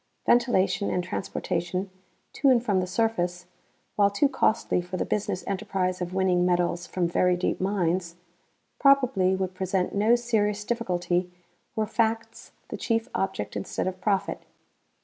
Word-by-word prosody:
Ventilation 235 -5 +2
and 180 - 0
transportation 180 +1 -3 0.4
to 275 - +3
and 245 -2 +3
from 200 -5 +2
the 180 - -1
surface, 180 -4 -1 0.5
while 200 -1 +4
too 200 +8 +2
costly 245 -8 +1
for 180 +1 -6
the - - -1
business 205 -3 -2
enterprise 190 -2 -2
of 175 0 -3
winning 185 -1 +2
metals 175 -1 +1
from 180 -2 -1
very 180 +1 +2
deep 180 - -1
mines, 180 -3 0 0.6
probably 255 -10 +4
would 190 -1 -2
present 185 0 -1
no 215 +4 +4
serious 210 -4 0
difficulty 180 -6 -1 0.4
were 220 -1 +1
facts 225 +1 -2 0.2
the - - -5
chief 225 -1 -1
object 105 - -2
instead 100 - -3
of 185 0 -4
profit. 200 -1 0
190 Hz, 145 wpm, -26 LUFS, 180-220 Hz, 0.6 s, while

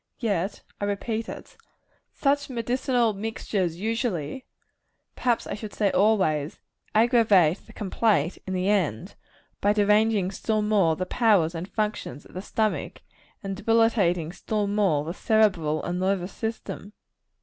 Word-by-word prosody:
Yet, 200 -4 -2 0.2
I 205 - -1
repeat 220 +3 -2
it, - - -9 0.6
such 285 0 0
medicinal 245 -1 0
mixtures 195 -4 -2
usually 225 - -2 0.7
perhaps 240 -2 0
I - - -4
should 210 0 -7
say 205 -3 +2
always 185 -8 +2 0.4
aggravate 215 - +4
the - - -14
complaint 195 -5 0
in 190 - -2
the 185 +1 0
end, 180 - 0 0.5
by 205 +1 +3
deranging 210 -2 +3
still 215 +1 -1
more 200 -7 +3
the 185 - -3
powers 195 -7 +3
and 170 +2 -5
functions 210 - -3
of - - -17
the 185 - -5
stomach, 215 +1 -2 0.4
and 195 -1 -3
debilitating 205 -6 +2
still 210 +2 -2
more 200 -8 +1
the 165 - -4
cerebral 185 -8 +2
and 175 +1 -2
nervous 190 0 -1
system. 220 -2 -5
205 Hz, 135 wpm, -26 LUFS, 180-220 Hz, 0.7 s, aggravate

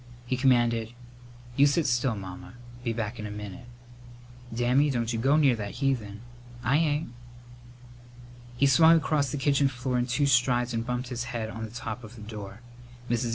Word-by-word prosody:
He 130 - -1
commanded, 120 -3 +2 0.6
"You 140 +2 +6
sit 150 +3 +1
still, 120 -1 +1
Mamma. 95 +3 -9 0.3
Be 120 - -1
back 115 0 -4
in 105 - -4
a - - -7
minute." 105 +1 -8 0.8
"Dammy, 125 +5 +2
don't 120 -3 -1
you 115 - -1
go 135 +5 +3
near 140 -5 +4
that 100 -2 -6
heathen!" 120 -7 -2 0.4
"I 135 +4 +3
ain't." 150 -3 0 1.5
He 140 - +3
swung 160 +4 +6
across 150 -3 0
the 145 - -3
kitchen 140 0 +2
floor 125 -1 -2
in 120 - -1
two 130 +4 +1
strides 125 -2 +2
and 115 0 -1
bumped 125 0 -3
his 125 -1 -3
head 120 -2 -4
on 110 0 -5
the - - -9
top 115 0 -6
of 110 +2 -11
the 110 - -11
door. 105 -1 -8 0.5
Mrs. 120 0 0
120 Hz, 180 wpm, -27 LUFS, 115-135 Hz, 1.5 s, You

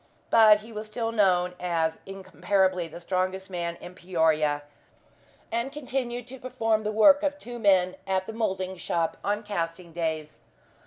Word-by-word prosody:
But 215 -2 +7
he 225 +2 -12
was 215 0 -6
still 225 +1 -3
known 180 -5 +2
as 165 -2 -1
incomparably 190 -2 0
the 165 +2 -10
strongest 185 +2 -2
man 170 -1 -3
in 180 - -11
Peoria, 160 -5 +1 0.9
and 235 +4 -1
continued 255 -4 -4
to 265 0 -9
perform 225 -4 0
the 215 0 -2
work 220 +7 +6
of 290 -1 -1
two 245 -4 -8
men 185 -4 +3
at 190 -1 0
the 220 - -7
moulding 190 -4 -2
shop 165 -1 -1
on 210 +2 -1
casting 170 -4 -4
days. 160 -2 -3
190 Hz, 155 wpm, -27 LUFS, 175-225 Hz, 0.9 s, But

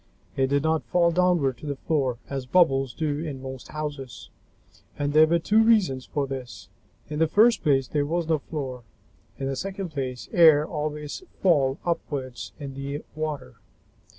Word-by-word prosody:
It 135 0 +2
did 140 +1 +1
not 160 0 +2
fall 170 -1 +3
downward 170 -8 +2
to 150 - -8
the 140 - -2
floor, 135 -4 -1
as 135 -2 -5
bubbles 135 -4 +3
do 150 -2 -1
in 150 -4 -5
most 130 -1 -8
houses, 145 -4 -6 0.7
and 145 0 -1
there 155 +1 +7
were 170 +2 +3
two 210 +7 +3
reasons 200 - +3
for 145 -2 -1
this. 125 -8 -7 0.4
In 150 - -3
the 160 - +4
first 220 +8 +4
place, 135 -4 +2
there 145 -1 -1
was 170 +1 -1
no 160 -2 +2
floor. 135 -4 -5 0.6
In 135 - -4
the 135 0 -2
second 195 +4 -4
place, 130 -4 -4
air 155 -3 +7
always 150 - -4 0.2
falls 140 -7 +3
upward 140 -7 -3 0.2
in 140 -2 -6
the 140 +2 -5
water. 155 - -5
145 Hz, 170 wpm, -25 LUFS, 135-160 Hz, 0.7 s, there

